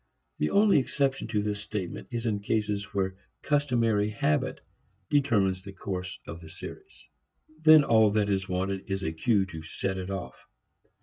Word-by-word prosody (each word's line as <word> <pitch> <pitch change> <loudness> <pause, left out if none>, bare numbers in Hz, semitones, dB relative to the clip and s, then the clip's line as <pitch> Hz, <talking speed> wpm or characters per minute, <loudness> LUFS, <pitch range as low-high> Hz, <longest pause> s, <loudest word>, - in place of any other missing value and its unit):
The 75 - +1
only 205 -6 +5
exception 135 0 -1
to 105 -2 0
this 105 -1 -2
statement 105 -4 -5
is 120 0 -4
in 105 -3 0
cases 105 -1 -1
where 95 -1 -2 0.3
customary 120 -8 +2
habit 75 -7 0 0.5
determines 105 -10 +2
the 100 -1 -9
course 95 -1 -5
of 85 +1 -8
the 80 - -11
series. 85 - -11 0.6
Then 155 -1 +8
all 110 -3 +5
that 105 0 +1
is 95 -2 -1
wanted 95 +1 -2
is 95 0 -2
a 80 - -1
cue 100 +4 +2
to 80 -4 -8
set 95 +4 -3
it 90 0 -5
off. 95 -2 -6
100 Hz, 165 wpm, -28 LUFS, 95-115 Hz, 0.6 s, Then